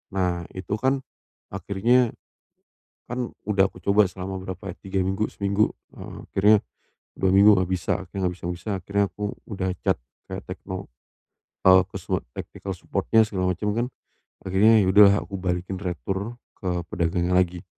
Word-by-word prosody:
Nah, 90 -3 0
itu 95 +2 -3
kan 135 +1 +1 0.5
akhirnya 105 +6 +2 1.0
kan 125 0 -3 0.2
udah 100 -2 +4
aku - - -13
coba 100 +1 +4
selama 95 +1 -6
berapa, 95 +1 -7 0.2
3 95 0 -1
minggu, 95 +3 0
seminggu, 100 +1 +1 0.2
heeh. - - -9
Akhirnya, 105 +2 +5 0.6
2 95 -1 +1
minggu 100 +2 +7
enggak 90 -1 0
bisa. 90 -2 -1
Akhirnya 95 +1 -2
nggak 90 - -2
bisa-bisa, 90 +3 -5
akhirnya 100 +2 +1
aku, 105 - -8 0.2
udah 95 -3 -2
chat - - +2 0.3
kayak - - -6
tekno, - - -6 0.8
eee, 95 0 +8
ke 95 - -18
semua - - -1
technical - - -6
support-nya, 110 - +2
segala 95 -3 -1
macem, 105 +4 -2
kan. 120 +1 +1 0.6
Akhirnya 105 +4 +5
ya 95 - +1
udah 105 - +8
lah, 100 - +5
aku 100 - -6
balikin 90 +1 -2
retur, 95 +5 -3 0.2
ke 90 -2 -2
pedagangnya 85 +1 0
lagi. 90 -1 +1
95 Hz, 155 wpm, -25 LUFS, 90-105 Hz, 1.0 s, eee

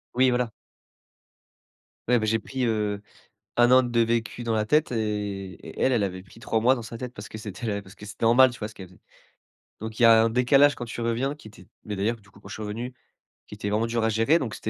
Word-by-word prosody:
Oui, 130 0 +5
voilà. 125 -1 0 1.6
Ouais, 120 -1 +4
beh, 110 - -1
j'ai 115 +1 +2
pris, 130 +3 -3
heu, 105 -2 -1 0.6
1 120 0 +5
an 130 0 +6
de 120 -1 +1
vécu 115 +1 0
dans 115 -1 -1
la 110 0 0
tête 150 +4 +2
et 105 -4 -3 0.2
et - - -9
elle 130 - +3
elle 115 -4 +2
avait 95 -1 -3
pris 115 - -17
3 110 0 0
mois 125 +3 +4
dans 120 - -6
sa 115 +1 -8
tête, 125 -1 -6
parce 105 - -9
que 110 - -8
c'était 105 +1 -8
la 100 -1 -1
parce 95 0 -15
que 105 - -12
c'était 100 +2 -5
normal, 130 +3 +6
tu 125 - -11
vois 105 - -3
ce 110 - -11
qu'elle 95 -2 -10
faisait. 90 - -20 0.8
Donc 110 +1 -7
il - - +3
y - - +7
a 115 -1 +7
un - - +3
décalage, 135 +4 +4
quand 120 - -6
tu 120 0 -7
reviens 120 +5 -1
qui 150 - -16
était 105 - -14 0.2
mais 105 - -4
d'ailleurs, 105 +4 0
du 100 - -23
coup 100 - -19
quand - - -13
je - - -8
revenu, 115 +4 -5 0.5
qui 105 - -10
était 100 0 -4
vraiment 110 +2 +1
dur 115 0 -1
à - - +2
gérer, 115 +10 +3
donc 120 -7 -4
c'était 110 - -5
115 Hz, 260 wpm, -25 LUFS, 105-125 Hz, 1.6 s, y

